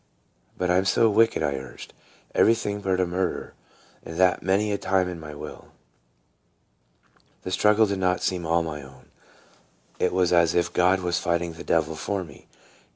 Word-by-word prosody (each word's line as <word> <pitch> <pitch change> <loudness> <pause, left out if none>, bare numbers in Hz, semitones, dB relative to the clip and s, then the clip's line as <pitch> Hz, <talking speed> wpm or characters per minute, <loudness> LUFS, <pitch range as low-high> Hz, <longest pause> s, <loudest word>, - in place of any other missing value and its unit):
But 90 -1 0
I 90 - +3
'm 95 - -1
so 110 +4 +3
wicked," 110 -5 +3
I 70 - 0
urged; 65 -2 -10 0.4
"everything 105 -3 +2
but 95 -1 0
a 90 - +2
murderer, 90 +1 -3 0.5
and 80 - -8
that 90 -1 +3
many 100 +3 +1
a 100 - 0
time 95 -1 +1
in 90 -2 -6
my 75 -2 -9
will." 75 +1 -10 1.7
The 95 - -5
struggle 105 +3 +4
did 100 -2 -2
not 90 -1 0
seem 90 -2 -1
all 85 +1 +1
my 75 -3 -5
own; 65 -1 -16 0.9
it - - +1
was 90 -1 +1
as 85 -1 +3
if 85 - +1
God 95 +1 +3
was 90 -1 -1
fighting 85 0 -1
the 80 - -10
devil 80 -1 0
for 100 +3 -3
me. 75 -5 -15
90 Hz, 175 wpm, -25 LUFS, 80-95 Hz, 1.7 s, struggle